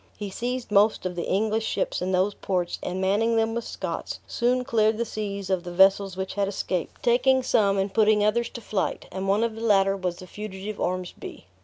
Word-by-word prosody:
He 205 -2 -5
seized 245 +2 -4
most 210 -1 +3
of 180 -1 -2
the 170 - -3
English 220 +3 +1
ships 205 - -1
in 185 +1 -1
those 190 +2 +2
ports, 180 -3 -2
and 180 +1 -3
manning 210 +5 +2
them 225 0 +1
with 235 0 -3
Scots, - - -5
soon 250 +1 0
cleared 220 -4 +2
the 235 - -1
seas 200 -3 -4
of 185 -2 +1
the 175 - -6
vessels 190 +1 +4
which 190 0 -3
had 200 -1 0
escaped, 185 -3 -3
taking 255 +2 +3
some, 200 -5 +2
and 195 0 -1
putting 215 -1 +4
others 235 +2 +1
to - - -9
flight; 210 -3 -2
and 190 0 -4
one 200 +3 +2
of 230 -1 0
the 225 - -8
latter 195 -3 +3
was 180 -2 -2
the 185 - -11
fugitive 205 +1 -7
Ormsby. 180 0 -4
205 Hz, 210 wpm, -25 LUFS, 190-225 Hz, -, vessels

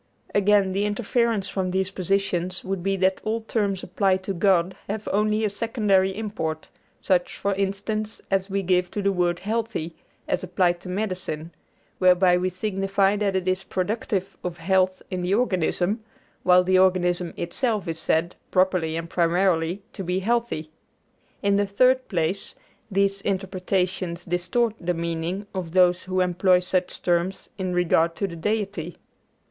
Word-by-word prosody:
Again, 205 -1 +4
the 200 +2 0
inference 215 0 0
from 190 -1 -2
these 190 +1 0
positions 185 -1 -1
would 190 -1 -3
be 195 +2 0
that 190 0 +1
all 225 +1 -1
terms 205 -4 -1
applied 190 0 +1
to 195 - -2
God 185 -1 +2
have 210 +1 -4
only 215 +1 +2
a - - +3
secondary 205 -3 +1
import, 160 -8 -4 0.3
such, 180 -2 +1
for 200 - 0
instance, 205 +3 -2
as 195 0 +1
we 195 0 -1
give 180 0 +2
to 205 - -4
the 200 - +3
word 175 -2 0
healthy, 215 -6 -2 0.3
as - - -1
applied 175 -2 +1
to 180 - -8
medicine; 180 -5 -3 0.5
whereby 180 -1 +5
we 180 +1 +1
signify 195 +1 +1
that 200 -2 0
it 185 -1 -1
is 185 +1 +1
productive 195 -1 -2
of 175 -1 -4
health 185 +2 +1
in 185 -1 -2
the 180 +3 +1
organism, 205 -1 0 0.4
while 180 0 +5
the 185 0 +3
organism 180 -2 +2
itself 210 +3 -1
is 165 -1 -3
said, 165 +2 0
properly 185 -4 +2
and 165 0 -4
primarily, 175 +1 +1
to 195 - -5
be 180 +1 -1
healthy. 210 -6 -1 0.7
In 200 0 +3
the 205 0 +1
third 255 +6 +3
place, 180 +1 -2 0.3
these 195 0 +1
interpretations 185 -2 -2
distort 180 +7 0
the 175 0 -1
meaning 170 +4 -3
of 180 -4 -4
those 180 -1 +4
who 185 0 -1
employ 180 +1 +3
such 180 0 -2
terms 175 +2 0
in 185 -1 -2
regard 165 -1 +2
to 200 - -1
the 170 - -8
Deity. 195 -2 -2
190 Hz, 155 wpm, -24 LUFS, 180-200 Hz, 0.7 s, whereby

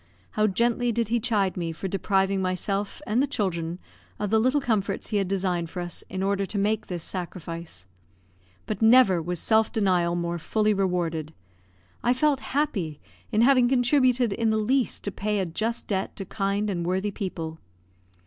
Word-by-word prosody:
How 215 0 +2
gently 235 +4 +1
did 230 -1 -1
he 235 +1 +2
chide 210 -5 +1
me 170 -2 -2
for 165 +4 -5
depriving 195 0 +1
myself 195 +2 -2
and 225 +5 +1
the 285 - +2
children 175 -9 -2 0.4
of 210 -1 -3
the 220 - +4
little 255 +6 +3
comforts 215 -7 -1
he 210 - 0
had 195 -2 +1
designed 180 -3 -1
for 180 - -6
us, 175 -1 -5
in 190 0 -3
order 200 0 +1
to 200 +2 -4
make 215 +2 0
this 175 -3 -4
sacrifice. 170 - -6 0.8
But 215 -1 -4
never 225 -6 +6
was 175 +2 -2
self 220 +3 +3
denial 180 -6 +2
more 170 0 -2
fully 215 +5 +1
rewarded; 170 -5 -1 0.7
I 245 - +3
felt 285 +1 +2
happy 215 - -2 0.3
in 215 -1 +3
having 250 -1 +5
contributed 250 -3 +3
in 225 +2 +1
the 220 - +2
least 250 +4 0
to 205 - -2
pay 210 +2 -1
a 190 - 0
just 220 +8 -2
debt 195 -2 -2
to 195 - -5
kind 200 +1 -1
and 175 -3 -2
worthy 190 +4 -1
people. 165 -6 -5
200 Hz, 175 wpm, -26 LUFS, 180-225 Hz, 0.8 s, never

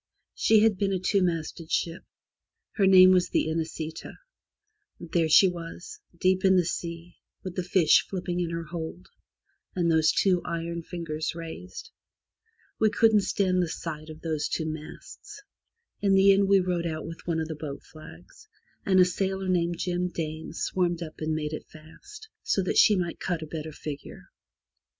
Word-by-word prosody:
She 220 -1 +4
had 220 -3 +3
been 200 -1 +1
a 190 - +1
two 195 +2 +1
masted 165 -2 -2
ship. 170 0 -1 0.7
Her 195 -3 +2
name 185 -1 +8
was 180 -1 +3
the - - +1
Inesita, 160 0 -4 0.9
There 165 -1 0
she 175 +5 +7
was, 175 - -7 0.2
deep 185 0 +2
in 190 -1 +5
the 180 -2 +3
sea, 170 0 -5 0.3
with 185 -1 -6
the 185 - -1
fish 175 -3 +3
flipping 180 -2 -3
in 175 -2 -1
her 165 0 -4
hold, 165 +2 -7 0.7
and 170 -2 +1
those 160 -1 +4
two 185 -3 +2
iron 170 0 -4
fingers 165 -2 -4
raised. 170 - -8 0.9
We 220 - +4
couldn't 220 -1 +4
stand 185 -1 +1
the 175 - -1
sight 155 -1 -6
of 155 0 -10
those 155 -3 -2
two 160 - -2
masts. 160 - -9 0.6
In 200 -1 +3
the 195 +1 +6
end 195 0 +2
we 195 -1 +5
rowed 175 -2 -1
out 155 -1 -4
with 165 +1 -9
one 165 -2 0
of 160 - -2
the 160 - -4
boat 145 -2 -7
flags, 155 - -15 0.4
and 190 -1 +3
a 180 - +8
sailor 190 +1 -2
named 175 -1 +1
Jim 180 -1 -1
Dane 160 -2 -5
swarmed 175 -2 -1
up 155 - -10
and 155 0 -1
made 150 0 -3
it - - -6
fast, 405 - -14
so 195 - 0
that 180 - +1
she 210 - +6
might 175 -3 -3
cut 175 -4 -2
a - - -5
better 155 0 -6
figure. 145 -1 -9
175 Hz, 175 wpm, -27 LUFS, 160-190 Hz, 0.9 s, name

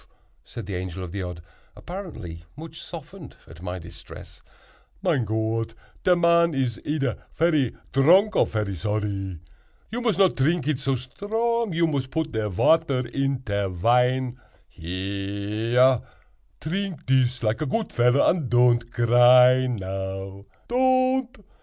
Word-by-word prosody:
said 115 - -8
the 100 - -6
Angel 90 0 -5
of 90 - -7
the 100 +1 -4
Odd, 90 -2 -6 0.3
apparently 105 - -8
much 160 +1 -9
softened 165 -1 -10
at 80 0 -14
my 90 0 -4
distress; 85 -1 -12 0.6
"mein 155 - +1
Gott, 110 +1 -2 0.3
te 180 - +4
man 170 -2 +3
is 125 -4 -1
eder 145 -4 -2
ferry 155 -7 +1 0.2
dronk 180 +10 +5
or - - +3
ferry 105 -3 -2
zorry. 100 -2 -3 0.5
You 240 +2 -3
mos 225 -7 +1
not 195 -2 +4
trink 150 +2 +1
it 150 -4 0
so 135 0 0
strong—you 205 - -1
mos 140 -5 -1
put 160 +2 -3
te 110 -1 -1
water 130 - +2
in 135 0 -1
te 100 -3 -1
wine. 125 +7 +1 0.3
Here, 100 +7 0 0.6
trink 185 +1 -4
dis, 130 -2 +1
like 110 +4 0
a 155 - -1
goot 220 +10 -2
veller, 125 +3 +3
und 160 -8 +1
don't 120 -1 +3
gry 125 +2 +5
now—don't!" 125 - -2
125 Hz, 135 wpm, -24 LUFS, 105-165 Hz, 0.6 s, dronk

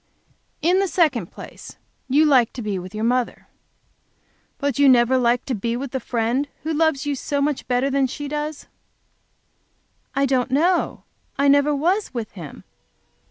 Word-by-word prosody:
"In 355 +4 +4
the 390 - +1
second 300 - +1
place, - - -11 0.3
you 295 +4 +4
like 260 -6 +4
to 245 - -6
be 205 -3 -2
with 185 +3 -9
your 215 - -3
mother. 245 +1 -1 1.1
But 285 -2 -2
you 285 -1 +6
never 245 0 +5
like 245 -1 +2
to 265 - -2
be 235 +2 -2
with 270 0 -5
the 265 - -2
Friend 240 +4 -1 0.2
who 320 +1 -2
loves 310 -2 +1
you 290 - 0
so 285 +1 -2
much 285 -1 -1
better 255 +2 +1
than 275 -1 +2
she 290 +3 -6
does?" 300 +1 -4 1.5
"I 275 +1 +2
don't 260 -1 +1
know, 340 +7 +1 0.3
I 280 - +2
never 285 +1 +4
was 350 +2 0
with 230 -3 -4
Him. 165 -8 -10
275 Hz, 165 wpm, -22 LUFS, 240-295 Hz, 1.5 s, you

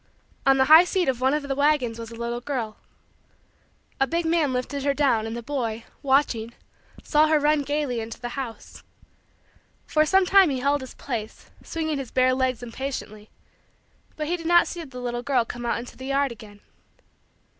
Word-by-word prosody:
On 270 0 +6
the 265 - +4
high 315 +4 +9
seat 365 0 0
of 255 -2 0
one 265 +3 +3
of 300 - -2
the 280 -1 -2
wagons 275 -5 +1
was 230 -1 -7
the 230 - -10
little 235 +1 -4
girl. 245 -6 -4 1.2
A 270 - +3
big 335 +5 -1
man 325 -4 +2
lifted 255 +3 -3
her 280 0 +1
down 240 -7 +2
and 225 +1 -5
the 235 - -7
boy, 230 -4 -3 0.2
watching, 265 -5 +1 0.5
saw 305 +1 +3
her 310 -1 +3
run 300 0 +2
gaily 285 -3 -2
into 225 0 -7
the 240 - -5
house. 245 -3 -7 1.0
For 310 - +2
some 385 +2 +4
time 385 -2 +6
he 270 - -1
held 280 +2 +1
his 260 - -9
place, 225 -5 -6
swinging 315 -3 -3
his 265 -3 -6
bare 255 0 +3
legs 255 -2 -1
impatiently, 230 -4 -6 0.9
but 305 - -3
he 340 +4 0
did 330 -1 -6
not 345 0 +6
see 345 -1 -6
the 260 -5 -9
little 240 -1 -3
girl 250 -3 +1
come 240 +1 -6
out - - 0
into 240 +1 -8
the 260 - -8
yard 275 -1 +1
again. 210 -3 -12
265 Hz, 190 wpm, -24 LUFS, 240-295 Hz, 1.2 s, high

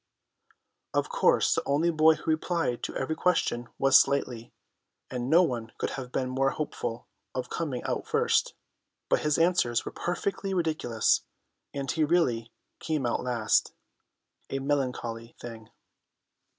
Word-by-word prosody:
Of - - +1
course - - +3
the - - 0
only 155 +5 +2
boy 160 0 +5
who 160 - -2
replied 155 -5 -1
to - - -6
every 130 +4 -1
question 120 -9 0
was 135 0 +7
Slightly, 125 -4 -2 0.6
and 125 0 -3
no 170 +4 +6
one 120 -8 -3
could - - -2
have 125 -2 -6
been 130 - -1
more 135 +1 +1
hopeful 120 -5 -4 0.3
of 125 -1 -4
coming 145 -7 -3
out - - -3
first, - - +1 0.5
but - - +3
his 150 -1 +1
answers 165 -9 +2
were - - -4
perfectly 195 +2 -2
ridiculous, 155 -10 +1 0.5
and 140 -1 -3
he 160 - +1
really 125 -8 +1 0.3
came 155 -5 -1
out 120 - 0
last: 120 -3 +1 0.7
a 135 - -2
melancholy 125 -4 -2
thing. 115 -2 -9
135 Hz, 140 wpm, -28 LUFS, 120-160 Hz, 0.7 s, was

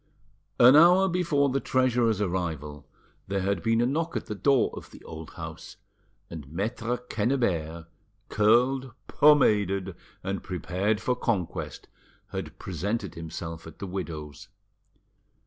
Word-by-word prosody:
An 125 +3 +8
hour 180 +5 +7
before 165 -6 +1
the 135 +1 0
treasurer's 125 -5 +1
arrival 80 -6 -3 0.4
there 100 0 -1
had 100 +1 -1
been 115 0 +2
a - - +3
knock 165 +6 -1
at - - -5
the - - -5
door 135 +5 +2
of - - -9
the - - -15
old 80 -1 -9
house, - - -8 0.5
and 75 -4 -9
Maitre 115 +6 -2
Quennebert, 105 - -1 0.4
curled, 125 +4 +2
pomaded, 100 -10 +3 0.3
and 95 0 -3
prepared 95 +3 -1
for 125 - 0
conquest, 95 -8 -3 0.4
had - - -6
presented 100 +6 -3
himself 80 -1 -7
at 80 - -12
the - - -6
widow's. 80 -6 -6
105 Hz, 130 wpm, -27 LUFS, 85-125 Hz, 0.5 s, An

